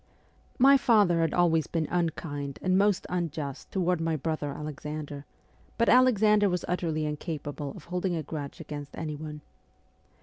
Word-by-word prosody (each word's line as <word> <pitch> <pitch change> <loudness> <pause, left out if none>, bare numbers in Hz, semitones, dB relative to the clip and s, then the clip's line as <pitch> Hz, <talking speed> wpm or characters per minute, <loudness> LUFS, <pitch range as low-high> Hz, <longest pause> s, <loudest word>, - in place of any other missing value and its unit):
My 275 +2 +7
father 205 -9 +4
had 165 - +1
always 165 -3 +2
been 160 -3 -1
unkind 150 -5 -2
and 185 0 +2
most 200 0 +3
unjust 155 -6 -4
toward 180 -3 +1
my 165 -1 0
brother 155 -1 -2
Alexander, 150 0 -6 0.5
but 230 - +3
Alexander 215 -5 +5
was 180 -1 -2
utterly 165 -3 -1
incapable 150 -2 -4
of - - -11
holding 180 +1 -2
a 160 - -2
grudge 145 -2 -6
against 145 -3 -7
anyone. 150 -1 -5
165 Hz, 140 wpm, -28 LUFS, 150-180 Hz, 0.5 s, My